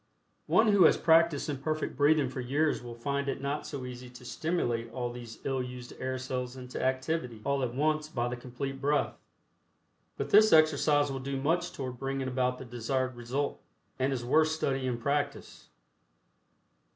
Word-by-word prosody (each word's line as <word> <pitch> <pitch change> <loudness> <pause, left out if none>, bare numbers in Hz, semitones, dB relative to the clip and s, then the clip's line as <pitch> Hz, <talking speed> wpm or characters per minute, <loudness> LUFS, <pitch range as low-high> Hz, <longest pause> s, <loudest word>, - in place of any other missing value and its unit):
One 220 -1 +4
who 200 -4 +6
has - - +6
practiced 165 -2 +4
imperfect 155 +2 -2
breathing 145 +1 +4
for 130 0 -5
years 145 +5 +1
will 120 -1 -8
find 140 +3 -2
it 135 - -2
not 140 +2 -3
so 135 -4 -5
easy 125 0 -8
to 125 0 -13
stimulate 120 -7 -1
all 120 -2 -3
these 120 -2 -9
ill 135 -1 -1
used 125 -1 -7
air 130 0 -2
cells 130 0 -4
into 125 -1 -6
activity 130 -2 -1
all 140 0 0
at 125 -2 -2
once 155 +2 +1
by 120 -5 -1
the 120 - -3
Complete 135 +2 -6
Breath, 145 +1 +1 1.0
but - - -3
this 215 +1 +7
exercise 150 -2 +4
will 135 - -3
do 135 +1 -3
much 170 +5 0
toward 125 -3 -6
bringing 135 -1 -2
about 125 0 0
the 130 - -8
desired 125 +2 -2
result, 125 +4 -3 0.4
and 130 +2 +1
is 125 -3 -2
worth 155 +5 +4
study 135 -4 -1
and 120 -2 -2
practice. 140 +4 -2
135 Hz, 175 wpm, -30 LUFS, 125-145 Hz, 1.0 s, this